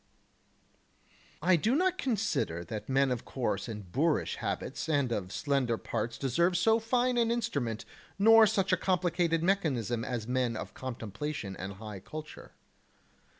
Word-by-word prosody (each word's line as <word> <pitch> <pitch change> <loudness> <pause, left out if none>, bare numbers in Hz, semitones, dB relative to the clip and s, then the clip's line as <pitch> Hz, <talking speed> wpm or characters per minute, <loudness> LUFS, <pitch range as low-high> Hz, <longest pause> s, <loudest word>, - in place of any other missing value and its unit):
12. 175 +4 +2
I - - +8
do 225 - +1
not 370 +3 +1
consider 210 - -1
that 105 +5 -6
men 135 0 +3
of 125 -2 -2
coarse 120 -6 -2
and 105 -5 -7
boorish 155 - +1
habits - - -3
and 140 -5 +2
of 95 -5 -2
slender 135 -4 0
parts 115 +1 -3
deserve 170 +7 +2
so 225 +6 +4
fine 245 +2 +1
an 230 -1 +3
instrument 140 - -1 0.3
nor 225 +2 +7
such 195 -3 +1
a - - +4
complicated 175 -3 +1
mechanism 135 - +1
as 115 -3 -3
men 125 -2 0
of - - -6
contemplation 115 -2 -5
and 95 +2 -6
high 105 0 -8
culture. 150 +11 -9
140 Hz, 150 wpm, -30 LUFS, 115-190 Hz, 0.3 s, I